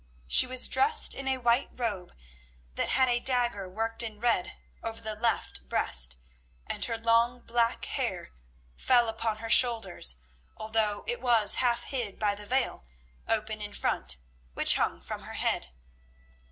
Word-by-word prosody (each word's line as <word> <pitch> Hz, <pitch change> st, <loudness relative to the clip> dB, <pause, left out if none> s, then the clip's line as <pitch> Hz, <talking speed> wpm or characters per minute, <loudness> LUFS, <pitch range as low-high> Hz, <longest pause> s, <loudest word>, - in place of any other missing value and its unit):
She 65 Hz, -, +7 dB
was 255 Hz, 0 st, +5 dB
dressed 445 Hz, +3 st, +5 dB
in 275 Hz, -, -6 dB
a 265 Hz, 0 st, 0 dB
white 240 Hz, 0 st, 0 dB
robe 205 Hz, -7 st, -5 dB, 0.6 s
that -, -, -2 dB
had 260 Hz, -1 st, +2 dB
a 240 Hz, -1 st, 0 dB
dagger 240 Hz, -7 st, -1 dB
worked 225 Hz, +4 st, -3 dB
in 220 Hz, -3 st, -6 dB
red 225 Hz, -6 st, -1 dB, 0.2 s
over 225 Hz, 0 st, -6 dB
the 220 Hz, -1 st, -5 dB
left 210 Hz, -, -2 dB
breast, -, -, -1 dB, 0.5 s
and -, -, -3 dB
her 230 Hz, -1 st, -4 dB
long 230 Hz, +2 st, +1 dB
black 235 Hz, 0 st, -1 dB
hair -, -, -4 dB, 0.4 s
fell 240 Hz, -2 st, +2 dB
upon 225 Hz, -1 st, -3 dB
her 225 Hz, +1 st, -8 dB
shoulders, 220 Hz, -, +4 dB, 0.4 s
although 215 Hz, -1 st, -2 dB
it 480 Hz, +1 st, -4 dB
was 230 Hz, -5 st, +3 dB
half 240 Hz, -1 st, 0 dB
hid 240 Hz, -8 st, -4 dB
by 210 Hz, -1 st, 0 dB
the 205 Hz, 0 st, -9 dB
veil, 260 Hz, -, -2 dB, 0.4 s
open 215 Hz, -1 st, -2 dB
in 205 Hz, 0 st, -7 dB
front, -, -, -1 dB, 0.4 s
which -, -, +5 dB
hung -, -, -2 dB
from -, -, -7 dB
her -, -, -10 dB
head. 60 Hz, -, -2 dB
230 Hz, 155 wpm, -27 LUFS, 210-245 Hz, 0.6 s, She